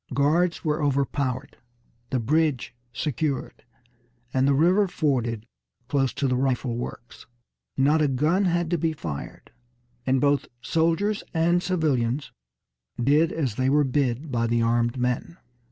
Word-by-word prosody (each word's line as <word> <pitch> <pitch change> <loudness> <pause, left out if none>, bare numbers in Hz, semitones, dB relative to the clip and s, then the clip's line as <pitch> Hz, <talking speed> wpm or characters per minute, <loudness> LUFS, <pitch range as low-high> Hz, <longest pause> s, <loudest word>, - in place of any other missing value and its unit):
Guards 165 +6 +2
were 155 0 0
overpowered, 140 -2 -1 0.5
the 130 - 0
bridge 145 0 0 0.2
secured, 140 0 -3 0.7
and 130 +1 +2
the 140 - +4
river 180 +7 +4
forded 125 - -1 0.4
close 135 -3 +1
to 140 - -1
the 125 - +1
rifle 130 -2 0
works. 120 0 -8 0.5
Not 150 +4 +3
a 150 - +3
gun 155 +9 +1
had 175 -1 0
to 175 - +1
be 160 +1 0
fired, 80 - -7 0.6
and 130 0 +3
both 145 +1 +2
soldiers 165 - 0
and 170 +2 +3
civilians 145 -8 0 0.7
did 145 +6 +3
as 135 -9 -1
they 130 0 +2
were 145 +2 +4
bid 135 +1 -1
by 115 -2 0
the 115 0 +1
armed 120 +1 +1
men. 125 +7 -2
140 Hz, 135 wpm, -25 LUFS, 125-160 Hz, 0.7 s, the